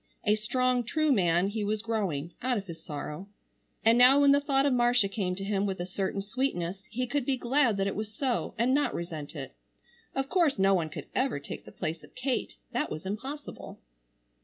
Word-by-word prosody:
A 210 Hz, -, +4 dB
strong 245 Hz, +3 st, +1 dB
true 310 Hz, +5 st, +1 dB
man 180 Hz, -4 st, +3 dB
he 215 Hz, +1 st, -2 dB
was 210 Hz, +1 st, -1 dB
growing, 185 Hz, -9 st, -2 dB
out 250 Hz, -1 st, +1 dB
of 200 Hz, -, -4 dB
his 165 Hz, -3 st, -9 dB
sorrow. 150 Hz, +4 st, -6 dB, 0.6 s
And 230 Hz, +2 st, +6 dB
now 255 Hz, +3 st, +8 dB
when 280 Hz, -1 st, +6 dB
the 285 Hz, -, +6 dB
thought 275 Hz, -1 st, +2 dB
of 280 Hz, -, +3 dB
Marcia 240 Hz, -3 st, +4 dB
came 195 Hz, -3 st, -2 dB
to 195 Hz, -, -5 dB
him 200 Hz, 0 st, 0 dB
with 190 Hz, -2 st, -3 dB
a 175 Hz, -, -2 dB
certain 190 Hz, +1 st, -2 dB
sweetness 195 Hz, -5 st, -2 dB
he 250 Hz, +4 st, -2 dB
could 280 Hz, +3 st, -1 dB
be 265 Hz, +1 st, 0 dB
glad 245 Hz, -3 st, +2 dB
that 195 Hz, -, +1 dB
it 195 Hz, -, -1 dB
was 215 Hz, 0 st, -4 dB
so, 250 Hz, +2 st, -1 dB
and 240 Hz, +4 st, +2 dB
not 290 Hz, +1 st, +2 dB
resent 160 Hz, -4 st, -5 dB
it. -, -, -6 dB, 0.6 s
Of 270 Hz, 0 st, 0 dB
course 335 Hz, -4 st, +2 dB
no 195 Hz, 0 st, +4 dB
one 165 Hz, -4 st, +1 dB
could -, -, -7 dB
ever 260 Hz, -, 0 dB
take 140 Hz, -, -8 dB
the -, -, -11 dB
place 160 Hz, -2 st, -4 dB
of -, -, -17 dB
Kate, 255 Hz, 0 st, -2 dB, 0.2 s
that 300 Hz, -, -1 dB
was 155 Hz, +4 st, -6 dB
impossible. 265 Hz, +10 st, -6 dB
215 Hz, 210 wpm, -29 LUFS, 190-255 Hz, 0.6 s, now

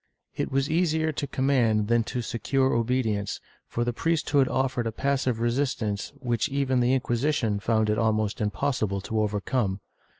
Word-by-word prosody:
^ -, -, -59 dB, 0.3 s
It -, -, -2 dB
was 135 Hz, +1 st, +1 dB
easier 160 Hz, -1 st, +1 dB
to 145 Hz, -1 st, -3 dB
command 120 Hz, -7 st, +2 dB
than 120 Hz, 0 st, +3 dB
to 125 Hz, +1 st, -3 dB
secure 130 Hz, +4 st, 0 dB
obedience, 115 Hz, -4 st, 0 dB, 0.3 s
for 120 Hz, -, -2 dB
the 120 Hz, 0 st, -1 dB
priesthood 155 Hz, -2 st, +1 dB
offered 130 Hz, -3 st, 0 dB
a -, -, -1 dB
passive 130 Hz, -1 st, 0 dB
resistance 120 Hz, -4 st, -1 dB
which 125 Hz, -2 st, -1 dB
even 135 Hz, -2 st, +1 dB
the 125 Hz, +2 st, +3 dB
Inquisition 120 Hz, -4 st, 0 dB
found 110 Hz, +1 st, +1 dB
it 105 Hz, +1 st, +1 dB
almost 110 Hz, -2 st, 0 dB
impossible 105 Hz, 0 st, -1 dB
to 110 Hz, +2 st, -2 dB
over 105 Hz, -1 st, 0 dB
come. 100 Hz, -3 st, -1 dB
120 Hz, 165 wpm, -26 LUFS, 110-135 Hz, 0.3 s, than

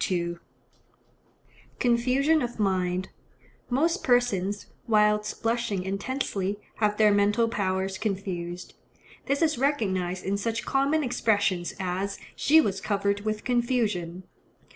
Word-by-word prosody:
Confusion 255 Hz, +6 st, +2 dB
of 240 Hz, -1 st, -4 dB
mind.—Most 195 Hz, -, -2 dB
persons, 205 Hz, -5 st, +1 dB, 0.2 s
whilst 210 Hz, -1 st, +2 dB
blushing 230 Hz, -4 st, 0 dB
intensely, 200 Hz, -1 st, -2 dB, 0.2 s
have 210 Hz, -1 st, +1 dB
their 215 Hz, -1 st, +5 dB
mental 205 Hz, +3 st, +3 dB
powers 190 Hz, -3 st, -1 dB
confused. 180 Hz, -4 st, -4 dB, 0.5 s
This 280 Hz, +4 st, +1 dB
is 310 Hz, -6 st, +1 dB
recognized 190 Hz, -10 st, 0 dB
in 195 Hz, +1 st, 0 dB
such 225 Hz, +2 st, -2 dB
common 280 Hz, +3 st, +1 dB
expressions 205 Hz, -8 st, 0 dB
as 190 Hz, +2 st, -2 dB, 0.2 s
"she 310 Hz, +3 st, +5 dB
was 195 Hz, -9 st, 0 dB
covered 200 Hz, -1 st, 0 dB
with 215 Hz, 0 st, -3 dB
confusion." 220 Hz, -8 st, 0 dB
210 Hz, 100 wpm, -27 LUFS, 190-245 Hz, 0.5 s, their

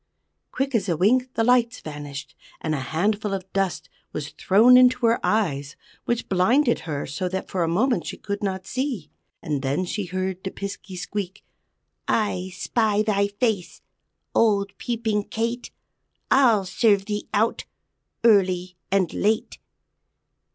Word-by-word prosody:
Quick 270 Hz, +1 st, -2 dB
as 210 Hz, -4 st, +1 dB
a 165 Hz, -, +1 dB
wink 250 Hz, +8 st, +3 dB
the 225 Hz, -, +2 dB
lights 245 Hz, 0 st, +3 dB
vanished, 145 Hz, -2 st, -7 dB, 0.3 s
and 155 Hz, -, -2 dB
a 150 Hz, -, -1 dB
handful 200 Hz, -, -1 dB
of 190 Hz, 0 st, -8 dB
dust 195 Hz, -4 st, -1 dB, 0.3 s
was 150 Hz, -1 st, -4 dB
thrown 220 Hz, +11 st, +5 dB
into 250 Hz, -1 st, +5 dB
her 230 Hz, +1 st, +3 dB
eyes, 155 Hz, -9 st, 0 dB, 0.3 s
which 240 Hz, 0 st, -1 dB
blinded 235 Hz, +8 st, +3 dB
her 145 Hz, -2 st, -2 dB
so 180 Hz, +6 st, -3 dB
that 190 Hz, +1 st, -4 dB
for 185 Hz, -, -1 dB
a -, -, 0 dB
moment 225 Hz, +10 st, +1 dB
she -, -, -5 dB
could 200 Hz, 0 st, -4 dB
not 190 Hz, -2 st, -2 dB
see. 255 Hz, -, -3 dB, 0.3 s
And 145 Hz, -3 st, -2 dB
then 140 Hz, +7 st, 0 dB
she 200 Hz, +2 st, -3 dB
heard 185 Hz, +1 st, -3 dB
the 190 Hz, -, -2 dB
Piskey 195 Hz, -1 st, -7 dB
squeak: 190 Hz, +1 st, -5 dB, 0.6 s
"_I 190 Hz, -4 st, 0 dB
spy 215 Hz, +1 st, +1 dB
thy 200 Hz, -2 st, +2 dB
face, 205 Hz, -3 st, -2 dB, 0.5 s
Old 200 Hz, -3 st, +2 dB
Peeping 220 Hz, -4 st, -1 dB
Kate, 235 Hz, +2 st, -3 dB, 0.6 s
I'll 235 Hz, -7 st, +5 dB
serve 200 Hz, +1 st, +2 dB
thee 210 Hz, 0 st, -4 dB
out, 220 Hz, +3 st, +1 dB, 0.6 s
Early 185 Hz, -5 st, +3 dB
and 190 Hz, -4 st, +2 dB
late! 215 Hz, +2 st, 0 dB
200 Hz, 145 wpm, -24 LUFS, 180-230 Hz, 0.6 s, thrown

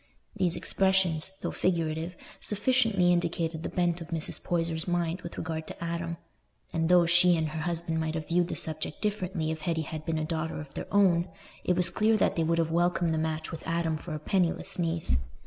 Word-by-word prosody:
These 175 Hz, -2 st, +1 dB
expressions, 190 Hz, -4 st, +2 dB
though -, -, -1 dB
figurative, 165 Hz, -1 st, -1 dB, 0.2 s
sufficiently 210 Hz, -4 st, +3 dB
indicated 170 Hz, -2 st, -1 dB
the -, -, -4 dB
bent 175 Hz, -1 st, 0 dB
of 165 Hz, -, -7 dB
Mrs. 165 Hz, -2 st, -2 dB
Poyser's 165 Hz, -1 st, -1 dB
mind 175 Hz, 0 st, -1 dB
with 170 Hz, -, -8 dB
regard 160 Hz, -1 st, -4 dB
to -, -, -7 dB
Adam; 170 Hz, 0 st, -3 dB, 0.6 s
and 165 Hz, 0 st, 0 dB
though 180 Hz, -1 st, +6 dB
she 175 Hz, 0 st, +5 dB
and 160 Hz, -1 st, 0 dB
her 155 Hz, +1 st, -4 dB
husband 165 Hz, -1 st, -1 dB
might 160 Hz, 0 st, -2 dB
have 155 Hz, -2 st, -4 dB
viewed 175 Hz, +1 st, +2 dB
the -, -, -4 dB
subject 155 Hz, -1 st, -1 dB
differently 185 Hz, -6 st, -1 dB
if 160 Hz, -1 st, -5 dB
Hetty 160 Hz, 0 st, -1 dB
had 155 Hz, +1 st, -6 dB
been 165 Hz, 0 st, -1 dB
a 155 Hz, -, -1 dB
daughter 160 Hz, -1 st, -3 dB
of 145 Hz, -2 st, -9 dB
their -, -, -6 dB
own, 185 Hz, -4 st, +4 dB, 0.3 s
it 180 Hz, -, +2 dB
was 180 Hz, 0 st, +4 dB
clear 220 Hz, 0 st, +3 dB
that -, -, +2 dB
they 165 Hz, -, +1 dB
would 165 Hz, +1 st, +1 dB
have 165 Hz, -1 st, +1 dB
welcomed 175 Hz, 0 st, +2 dB
the 160 Hz, -, 0 dB
match 160 Hz, 0 st, -2 dB
with 165 Hz, -1 st, -6 dB
Adam 165 Hz, -1 st, 0 dB
for 155 Hz, +1 st, -6 dB
a -, -, -4 dB
penniless 180 Hz, +3 st, 0 dB
niece. 160 Hz, -, 0 dB
170 Hz, 205 wpm, -29 LUFS, 160-180 Hz, 0.6 s, though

